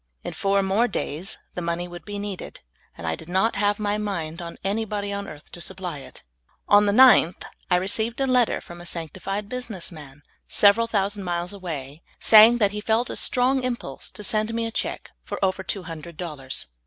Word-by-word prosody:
In - - -5
four 195 0 +1
more 200 +5 +2
days 170 -4 -3 0.2
the 180 - -4
money 170 +1 -2
would 175 0 -10
be 205 -1 -5
needed, 200 -2 -6 0.4
and 85 - -7
I 80 - 0
did 160 - -12
not 190 +6 +2
have 205 +1 +2
m}^ 210 0 -1
mind 170 -5 -3
on 170 -1 -7
any 205 +4 0
bod}^ 205 -1 -3
on 200 0 -4
earth 150 -3 -11
to 175 - -9
supply 180 -4 -4
it. - - -13 0.4
On 205 0 +6
the - - +4
9th 220 -7 +6 0.3
I 180 - +4
received 220 +6 -1
a 270 - +2
letter 250 -3 +2
from 175 0 -11
a - - -10
sanctified 190 +5 -4
business 225 -7 -5
man, 145 -3 -12 0.2
several 215 +3 +4
thousand 200 -2 -1
MARVELOUS 175 +1 -2
ANSWER - - -8
TO - - -17
PRAYER. 175 -4 -3
II9 140 - -4
miles - - -11
away, 145 +4 -15 0.2
saying 220 +2 +8
that 205 -4 +3
he 210 0 -4
"felt 225 +3 +1
a - - -4
strong 260 +2 +2
impulse 240 - -4
to 210 - -10
send 215 +2 0
me 230 0 0
a 225 - -3
check - - -4
for - - -5
over 190 0 -1
two 190 +1 -3
hundred 165 -1 -9
dollars. 150 -7 -4
195 Hz, 220 wpm, -24 LUFS, 175-215 Hz, 0.4 s, saying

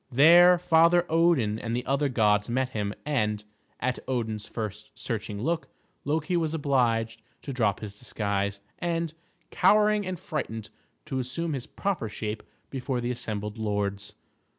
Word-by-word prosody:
There 170 +7 +8
Father 170 0 +4
Odin 160 -10 +3
and 115 0 -3
the 125 - -2
other 140 +2 +1
gods 105 -4 +2
met 130 +2 0
him; 105 -4 -3
and, 105 -8 0 0.4
at 125 0 -1
Odin's 110 -4 -2
first 105 -2 -5
searching 110 -2 -4
look, 165 +2 -1 0.4
Loki 155 +5 0
was 165 -2 0
obliged 115 -6 +1 0.2
to 140 - -5
drop 110 -6 +1
his 105 -1 -7
disguise, 100 -4 -2 0.2
and, 170 -2 -1 0.4
cowering 210 -1 +4
and 185 -2 -4
frightened, 115 -10 -4 0.3
to 130 - -2
assume 145 +6 -2
his 130 -3 -4
proper 190 - -2
shape 105 +1 -4 0.3
before 130 -1 -2
the 120 +1 -1
assembled 105 -3 -4
lords. 100 -2 -2
125 Hz, 145 wpm, -27 LUFS, 105-160 Hz, 0.4 s, There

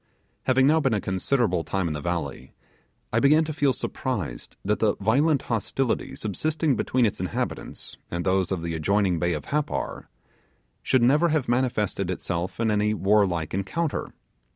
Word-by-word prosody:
Having 130 0 +4
now 155 +3 +5
been 135 -7 +1
a - - +1
considerable 95 -1 0
time 95 0 -1
in 80 - -2
the 75 - -4
valley, 85 -5 -4 0.6
I 110 - +4
began 150 +5 +5
to 155 0 -4
feel 145 -2 +2
surprised 100 - -4
that 105 +2 +1
the 110 -2 +2
violent 135 +8 +2
hostility 120 +3 -1
subsisting 150 - 0
between 125 -1 +1
its 105 - -1
inhabitants, 90 0 -4
and 85 0 -3
those 95 -1 +1
of 90 -3 -2
the 85 -1 -2
adjoining 90 +2 +1
bay 85 +1 +1
of 75 - -4
Happar, 150 0 -2 0.7
should 130 -2 +2
never 150 +7 +4
have 155 -4 0
manifested 115 -7 0
itself 90 0 -3
in 115 -1 +2
any 105 +1 +1
warlike 95 -6 +2
encounter. 140 - -2
105 Hz, 160 wpm, -25 LUFS, 90-135 Hz, 0.7 s, now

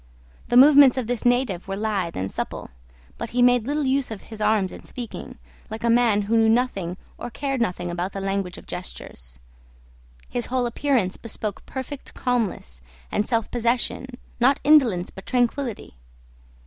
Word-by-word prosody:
The 240 - +3
movements 280 -1 +8
of 255 - -1
this 245 0 -3
native 245 -8 +1
were 195 - -3
lithe 200 -5 -2
and 95 +1 -3
supple; - - -5 0.5
but 230 - -4
he 245 +1 +2
made 245 -2 +4
little 295 0 0
use 270 0 +1
of 220 -3 -6
his 220 -1 -10
arms 210 -3 +2
in - - -10
speaking, 240 -3 -8 0.3
like 220 +1 -6
a 235 - +3
man 230 -4 +3
who 220 +3 0
knew 225 0 +4
nothing 210 -7 0 0.2
or - - -5
cared 270 +1 -2
nothing 175 -5 -1
about 175 +2 -3
the 195 - -5
language 195 -2 -2
of - - -12
gestures. 60 - -7 0.9
His 240 -1 -3
whole 255 -1 0
appearance 240 -5 0
bespoke 215 -2 -5
perfect 265 +1 -6
calmness 215 - -2 0.3
and 210 - 0
self 230 -3 0
possession, 240 +2 0 0.3
not 260 +3 +4
indolence 245 -12 +4
but 190 - -12
tranquillity. 245 - -1
230 Hz, 165 wpm, -24 LUFS, 195-250 Hz, 0.9 s, movements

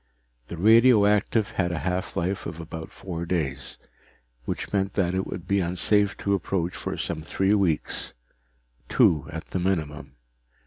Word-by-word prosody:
The 85 - -7
radioactive 110 0 +4
had 90 -2 0
a 85 - -2
half 90 +1 -2
life 95 +3 -1
of 80 -1 -7
about 80 0 -7
four 85 -3 -6
days, 70 -6 -2 0.7
which - - -4
meant 95 -1 0
that 90 -3 +1
it 95 +1 -1
would 90 - -7
be 100 0 +2
unsafe 100 +3 +1
to 100 - +2
approach 90 -2 -1
for - - -4
some 85 -2 -3
three 95 +5 +1
weeks 95 -7 0 0.7
two 75 -3 +3
at 80 +1 -6
the 95 - -1
minimum. 75 -6 -2
90 Hz, 150 wpm, -25 LUFS, 80-100 Hz, 0.7 s, radioactive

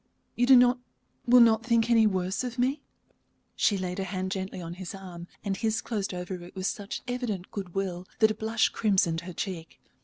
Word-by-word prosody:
You 245 - +2
do 265 - +9
not 245 0 +5 0.5
will 245 +1 +8
not 225 -1 +5
think 230 -1 +2
any 225 -2 +6
worse 190 +2 -1
of 250 0 -5
me?" 265 +4 +1 0.7
She 205 - +2
laid 185 0 -3
her - - -1
hand 185 0 -3
gently 190 -1 -4
on 170 -1 -6
his 185 +1 -6
arm, 180 -3 -9 0.2
and 195 -1 0
his 220 +3 0
closed 210 -4 -3
over 180 0 -5
it 175 - -13
with 185 -1 -4
such 200 0 -4
evident 240 -7 -3
good 190 -4 -6
will 185 -2 -3
that 220 -1 +4
a - - 0
blush 220 +1 +1
crimsoned 185 -6 +1
her 180 +1 -8
cheek. 165 -2 -6
195 Hz, 205 wpm, -28 LUFS, 185-230 Hz, 0.7 s, do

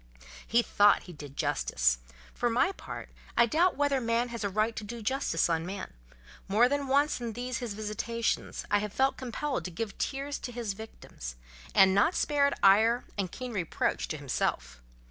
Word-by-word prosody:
He 235 +1 +3
thought 205 -2 +4
he 180 - -10
did 145 -2 -10
justice; - - +1 0.3
for 240 - 0
my 245 +11 +2
part - - -8 0.3
I 235 - +7
doubt 335 +9 +2
whether 285 -2 +2
man 230 +1 +1
has 235 -2 -5
a 200 - 0
right 215 +3 0
to 215 - -4
do 235 +3 -6
such 225 - -9
justice 265 - +1
on 165 -1 0
man: 190 - -6 0.5
more 215 +5 +5
than 285 +1 -1
once 280 0 +2
in 230 -2 -3
these 245 +1 -3
his 235 -5 -4
visitations, 220 +2 -2
I 205 - +4
have 210 -1 -4
felt 270 +1 +2
compelled 260 +2 -3
to - - -3
give 200 +4 -4
tears 275 +1 -2
to 245 - -6
his 230 -4 -3
victims, 195 - -9 0.4
and 190 0 +7
not 205 - +3
spared 285 -2 +2
ire 220 +5 +5
and 190 -4 -2
keen 250 -2 -6
reproach 165 - -1
to - - -4
himself. - - -2
230 Hz, 185 wpm, -29 LUFS, 200-255 Hz, 0.5 s, I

